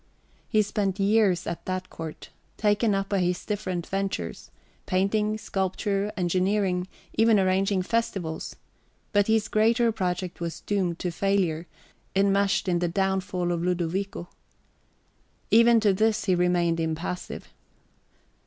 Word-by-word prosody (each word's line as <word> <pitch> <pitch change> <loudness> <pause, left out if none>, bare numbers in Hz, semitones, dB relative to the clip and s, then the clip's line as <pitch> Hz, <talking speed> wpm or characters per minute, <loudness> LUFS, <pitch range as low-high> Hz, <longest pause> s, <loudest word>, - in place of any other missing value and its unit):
He 215 -2 +3
spent 200 -1 -2
years 200 -3 +3
at 170 - -4
that 185 0 -3
court, 160 -2 -8 0.3
taken 210 0 +2
up 195 0 -2
by 200 - +1
his 180 0 -1
different 185 -5 -3
ventures, 195 - -3 0.4
painting, 210 +3 +1
sculpture, 195 +1 -1
engineering, 185 +1 +1 0.3
even 225 -1 +4
arranging 190 0 +2
festivities 190 -7 -2 0.6
but 205 -1 +3
his 220 -1 +2
greater 230 +2 +3
project 180 -4 -3
was 170 -1 -4
doomed 185 -5 -1
to 180 - -3
failure, 175 -3 0 0.5
enmeshed 200 0 +2
in 175 -1 +2
the 175 - 0
downfall 190 0 -1
of 170 -1 -1
Ludovico. 180 +1 -2 1.2
Even 230 +1 +6
to 210 -3 +3
this 215 +1 +1
he 190 - +3
remained 175 -1 +2
impassive. 165 +2 -4
190 Hz, 125 wpm, -26 LUFS, 180-205 Hz, 1.2 s, Even